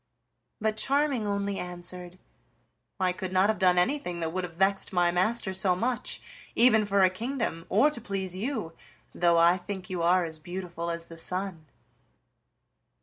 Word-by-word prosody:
But 215 -1 -1
Charming 275 -3 +1
only 200 -1 -2
answered: 180 0 -3 0.8
"I 185 -1 +2
could 185 0 -5
not 190 +2 +3
have 215 -4 0
done 180 -1 +4
anything 180 -3 0
that 165 -1 -2
would 185 0 -1
have 170 -2 -7
vexed 195 +2 +1
my 175 -2 +3
master 190 +3 0
so 185 -1 +3
much, 240 +5 -1 0.4
even 220 -3 +5
for 200 -1 +3
a 185 - +6
kingdom, 225 -5 -3
or 250 +10 +4
to 240 - -6
please 190 -3 -3
you, 215 -5 -3 0.4
though 170 -1 +3
I 170 +2 +5
think 190 0 -7
you 180 -2 -2
are 175 +1 +3
as 160 -1 -7
beautiful 175 0 -5
as 170 0 -3
the 165 - -12
sun." 180 -2 -2
185 Hz, 165 wpm, -28 LUFS, 175-210 Hz, 0.8 s, a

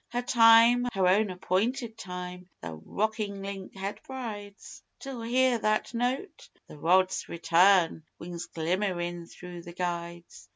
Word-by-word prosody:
Her 245 +1 -2
time, 235 0 +6
her 190 -2 +2
own 205 +3 +3
appointed 220 +6 -1
time, 180 -1 -7
the 80 -1 -7
rocking 200 - -3
link 195 -1 -7
head 200 +2 -4
bides, 210 -6 -8 0.2
Till 270 -4 -7
hear 245 +1 +2
that 215 +2 0
note? 250 +9 -3 0.2
the - - -12
rod's 185 +4 +2
return 170 0 +4 0.2
whings 170 0 -7
glimmerin' 175 0 -2
through 180 0 -10
the 170 0 -10
guides. 170 - -5
195 Hz, 130 wpm, -28 LUFS, 175-225 Hz, 0.2 s, time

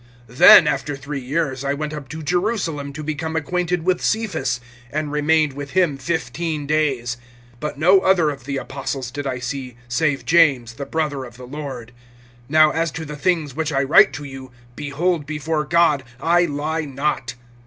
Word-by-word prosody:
(18)Then, 125 - +8
after 145 0 -1
three 140 +1 -5
years, 135 0 -2
I 140 +1 0
went 150 +1 -4
up 145 -4 -7
to 160 +1 -7
Jerusalem 175 -4 -1
to 155 +2 -7
become 155 +1 -3
acquainted 175 +1 -1
with 185 -1 +1
Cephas, 195 - 0 0.3
and 150 +1 -2
remained 150 0 +2
with 140 0 -7
him 180 -6 +2
fifteen 160 +1 -3
days. 135 -6 0 0.4
(19)But 150 -1 -4
no 185 +6 +5
other 180 -5 +3
of 135 -3 -10
the 140 0 -3
apostles 135 -2 -4
did 145 +1 -4
I 130 -1 -2
see, 125 -1 -5
save 140 +3 0
James, 140 -8 +3
the 140 +3 -7
brother 150 -3 -2
of 120 -1 -11
the 125 - -10
Lord. 130 -4 -7 0.6
(20)Now 155 0 +5
as 165 +1 0
to 160 - -5
the 150 0 -7
things 155 -2 0
which 160 +2 -2
I 135 -1 +1
write 145 +5 +6
to 145 - -6
you, 135 -2 -9 0.3
behold 150 +3 -1
before 155 0 -2
God, 160 -3 +3 0.2
I 175 +4 +3
lie 155 +1 -2
not. 140 -2 -2
150 Hz, 175 wpm, -21 LUFS, 135-160 Hz, 0.6 s, 18)Then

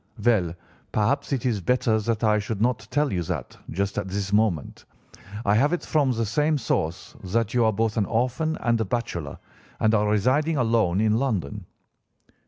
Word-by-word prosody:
"'Well, 95 -8 +2 0.4
perhaps 110 +9 0
it 130 -3 -1
is 110 -6 0
better 110 +2 +2
that 110 +1 -2
I 105 -1 +3
should 105 0 -4
not 115 -1 0
tell 145 -3 +1
you 90 - 0
that 80 -6 -4
just 100 +3 -1
at - - -4
this 100 +1 -3
moment. 105 -9 0 0.6
I 100 - +3
have 140 +9 +3
it 175 - -1
from 145 -4 +2
the 115 -2 -1
same 150 +7 +1
source 90 - -2
that 110 +4 -1
you 120 -1 +3
are 110 - +4
both 110 +2 -1
an 100 -3 +1
orphan 130 +7 0
and 115 -2 +1
a - - 0
bachelor 95 -10 -3 0.4
and 110 0 +3
are 105 -1 +2
residing 130 +10 +2
alone 115 -6 +2
in 110 0 +3
London. 105 - -2
110 Hz, 185 wpm, -25 LUFS, 100-125 Hz, 0.6 s, are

